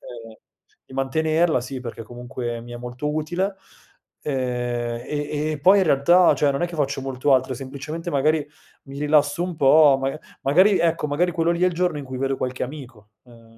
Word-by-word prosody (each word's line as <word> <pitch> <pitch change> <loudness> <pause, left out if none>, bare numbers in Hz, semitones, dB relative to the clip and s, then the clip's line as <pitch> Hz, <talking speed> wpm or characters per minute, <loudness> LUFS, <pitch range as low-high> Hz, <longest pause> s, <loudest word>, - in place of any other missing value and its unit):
ehm, 115 -2 -11 0.5
di - - -16
mantenerla, 155 +3 +1
sì, 130 0 -6
perché 115 -2 -7
comunque 120 0 -6
mi 120 +1 -11
è 120 - -6
molto 125 +4 -5
utile. 175 +6 -2 0.7
Ehm, 120 -3 -2
e 145 0 -3 0.2
e - - -1
e 150 - -6
poi 190 +7 +6
in 190 - +3
realtà, 170 +5 +5
cioè, 145 - +2
non 140 - -2
è - - +2
che 175 - -9
faccio 140 -2 -1
molto 135 +1 0
altro, 130 0 0
semplicemente 145 +6 -6
magari 150 +1 +1 0.4
mi 140 0 -9
rilasso 150 +2 +2
un 180 -2 -4
po', 140 0 +6
maga 135 +3 -2 0.2
magari 185 +8 +4
ecco, 165 -2 +1
magari 170 +5 +1
quello 165 -1 +1
lì 170 +1 -2
è - - +6
il 180 - +1
giorno 175 -3 0
in 140 - -7
cui 130 -1 -7
vedo 135 0 -1
qualche 130 0 -4
amico, 125 -6 -11
ehm, 120 -2 -18
140 Hz, 200 wpm, -23 LUFS, 125-160 Hz, 0.7 s, poi